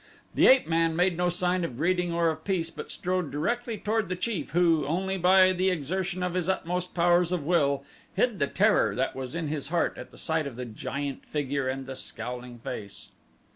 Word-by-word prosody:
The -, -, +5 dB
ape 260 Hz, 0 st, +6 dB
man 165 Hz, 0 st, +2 dB
made 180 Hz, +1 st, +2 dB
no 180 Hz, +1 st, +1 dB
sign 180 Hz, 0 st, 0 dB
of 125 Hz, -8 st, -4 dB
greeting 175 Hz, +3 st, +1 dB
or 170 Hz, -1 st, +2 dB
of 160 Hz, 0 st, -8 dB
peace 170 Hz, -4 st, -1 dB
but -, -, -8 dB
strode 180 Hz, -3 st, -2 dB
directly 230 Hz, -, -2 dB
toward 215 Hz, -2 st, -1 dB
the 185 Hz, -, -1 dB
chief 185 Hz, -4 st, -3 dB
who, 165 Hz, -1 st, +3 dB
only 190 Hz, +5 st, -1 dB
by 185 Hz, +1 st, +5 dB
the 185 Hz, +1 st, +2 dB
exertion 180 Hz, +3 st, -2 dB
of 180 Hz, -1 st, -1 dB
his 180 Hz, -1 st, -1 dB
utmost 180 Hz, -1 st, -2 dB
powers 175 Hz, 0 st, +3 dB
of 180 Hz, -5 st, -1 dB
will, 140 Hz, -5 st, +2 dB, 0.3 s
hid 235 Hz, -6 st, +1 dB
the 140 Hz, -, +2 dB
terror 205 Hz, +7 st, +3 dB
that 130 Hz, +1 st, -1 dB
was 130 Hz, +2 st, -5 dB
in 165 Hz, -2 st, -2 dB
his 145 Hz, -2 st, -3 dB
heart 170 Hz, +2 st, 0 dB
at -, -, -10 dB
sight 160 Hz, -2 st, -1 dB
of 135 Hz, -, -7 dB
the 125 Hz, +1 st, -5 dB
giant 140 Hz, +5 st, -5 dB
figure 140 Hz, -2 st, -1 dB
and 135 Hz, +1 st, -3 dB
the 135 Hz, 0 st, -6 dB
scowling 125 Hz, -1 st, -6 dB
face. 100 Hz, -3 st, -7 dB
170 Hz, 205 wpm, -27 LUFS, 145-185 Hz, 0.3 s, ape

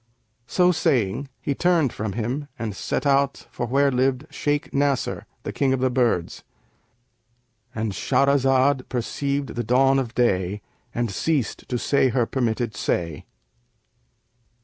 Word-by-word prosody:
So 180 Hz, +9 st, +3 dB
saying, 140 Hz, -, 0 dB
he 140 Hz, -, -1 dB
turned 165 Hz, -4 st, +2 dB
from 105 Hz, -2 st, -3 dB
him 125 Hz, +7 st, -3 dB
and 110 Hz, -4 st, -4 dB
set -, -, -2 dB
out 140 Hz, 0 st, +2 dB
for 120 Hz, -, -3 dB
where 140 Hz, +3 st, +3 dB
lived 130 Hz, +2 st, +1 dB
Shaykh 145 Hz, 0 st, -1 dB
Nasr, 140 Hz, -2 st, 0 dB, 0.2 s
the -, -, -4 dB
King 135 Hz, -2 st, +1 dB
of 130 Hz, -, 0 dB
the 130 Hz, 0 st, +1 dB
Birds."—And 115 Hz, +1 st, -5 dB
Shahrazad 135 Hz, +3 st, +2 dB
perceived 140 Hz, +3 st, -2 dB
the 120 Hz, -, -3 dB
dawn 135 Hz, +4 st, +4 dB
of 120 Hz, -2 st, -4 dB
day 100 Hz, -4 st, +1 dB, 0.3 s
and 120 Hz, -2 st, -2 dB
ceased 145 Hz, +4 st, -1 dB
to 125 Hz, -, 0 dB
say 135 Hz, +2 st, +2 dB
her 120 Hz, -1 st, +1 dB
permitted 115 Hz, -3 st, -1 dB
say. 85 Hz, -7 st, -2 dB
125 Hz, 130 wpm, -24 LUFS, 115-140 Hz, 0.3 s, dawn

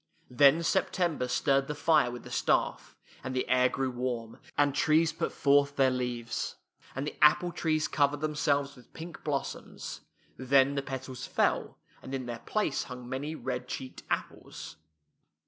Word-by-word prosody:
Then 140 Hz, +6 st, +5 dB
September 170 Hz, -5 st, +1 dB
stirred 135 Hz, +2 st, +2 dB
the 150 Hz, -, -3 dB
fire 155 Hz, -4 st, +3 dB
with 120 Hz, 0 st, -7 dB
the -, -, -11 dB
staff, -, -, 0 dB, 0.3 s
and 130 Hz, 0 st, -4 dB
the 130 Hz, -, 0 dB
air 125 Hz, 0 st, +4 dB
grew 135 Hz, -1 st, -1 dB
warm, 120 Hz, -2 st, -4 dB, 0.2 s
and 145 Hz, -1 st, +3 dB
trees 160 Hz, +2 st, +3 dB
put -, -, -2 dB
forth 140 Hz, 0 st, +3 dB
their 135 Hz, -2 st, +4 dB
leaves, 125 Hz, -2 st, -3 dB, 0.4 s
and 135 Hz, +2 st, -2 dB
the 150 Hz, -, -5 dB
apple 175 Hz, +4 st, +5 dB
trees 155 Hz, -2 st, 0 dB
cov 145 Hz, 0 st, +2 dB
ered 145 Hz, -, -4 dB
themselves 145 Hz, -2 st, 0 dB
with 125 Hz, -, -18 dB
pink 165 Hz, +1 st, -9 dB
blossoms. 145 Hz, -3 st, -4 dB, 0.4 s
Then 135 Hz, +1 st, +4 dB
the 140 Hz, -, -1 dB
petals 130 Hz, -1 st, -6 dB
fell, -, -, 0 dB, 0.2 s
and 135 Hz, -, -5 dB
in 130 Hz, -2 st, -4 dB
their 120 Hz, -1 st, -5 dB
place 210 Hz, -, -1 dB
hung 125 Hz, -1 st, -8 dB
many 145 Hz, +5 st, -4 dB
red 125 Hz, -3 st, -4 dB
cheeked 130 Hz, 0 st, -6 dB
apples. -, -, -4 dB
135 Hz, 165 wpm, -30 LUFS, 125-150 Hz, 0.4 s, Then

